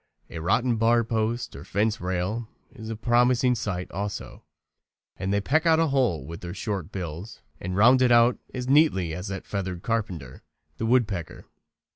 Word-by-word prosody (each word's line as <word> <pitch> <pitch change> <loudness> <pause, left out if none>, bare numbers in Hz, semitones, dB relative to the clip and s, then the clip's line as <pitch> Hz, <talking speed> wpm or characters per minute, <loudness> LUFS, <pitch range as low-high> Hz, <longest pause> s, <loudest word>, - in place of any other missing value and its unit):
A 85 - -5
rotten 115 +8 +1
bar 115 +1 +3
post 115 +1 -2
or - - -8
fence 110 +3 0
rail 95 +6 -2 0.3
is 110 -4 -9
a 115 - -3
promising 125 +3 +3
site 90 -6 -3
also, 100 +2 -5 0.7
and 95 0 -3
they 100 - +2
peck 155 +10 +1
out 160 -1 +5
a 165 -2 +2
hole 120 - +1
with 85 +3 -8
their 90 +1 -6
short 100 -4 -4
bills 90 +3 -7 0.2
and 90 +1 -4
round 125 +5 +6
it 125 -1 +4
out 120 +1 +5
quite - - -8
as 125 0 -4
neatly 130 - +3
as 90 +5 -5
that 95 -1 -5
feathered 95 -3 -4
carpenter, 100 - -3 0.4
the 115 - -2
woodpecker. 105 -9 0
110 Hz, 175 wpm, -26 LUFS, 90-120 Hz, 0.7 s, round